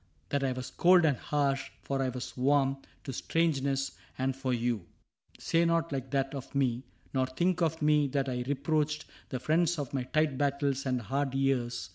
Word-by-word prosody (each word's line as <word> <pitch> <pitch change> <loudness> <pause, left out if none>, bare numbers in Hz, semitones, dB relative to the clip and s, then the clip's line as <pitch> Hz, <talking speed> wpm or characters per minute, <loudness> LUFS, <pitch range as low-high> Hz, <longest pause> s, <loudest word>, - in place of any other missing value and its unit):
That 140 -1 0
I 135 - +1
was 130 0 -5
cold 180 -1 +5
and 145 -4 +3
harsh, 140 0 0
for 135 -1 -1
I 130 - +1
was 125 0 -6
warm 135 +1 +2 0.3
To 135 - -5
strangeness, 140 -3 0 0.3
and 130 0 0
for 135 -1 -2
you... 120 -6 -1 0.5
Say 165 0 +2
not 165 -1 +1
like 135 -2 -3
that 135 0 0
Of 135 0 -7
me 130 -2 +1
— - - -32
nor 130 -1 +2
think 175 +7 0
of 160 -1 +1
me 150 -1 +4
that 135 0 -1
I 125 -1 -1
reproached 150 +2 0 0.2
The 130 - -3
friends 165 +5 +2
of 140 -3 -4
my 135 - 0
tight 155 -1 +1
battles 140 -1 0
and 125 -2 0
hard 135 +3 -1
years. 135 -5 0
135 Hz, 190 wpm, -30 LUFS, 130-150 Hz, 0.5 s, cold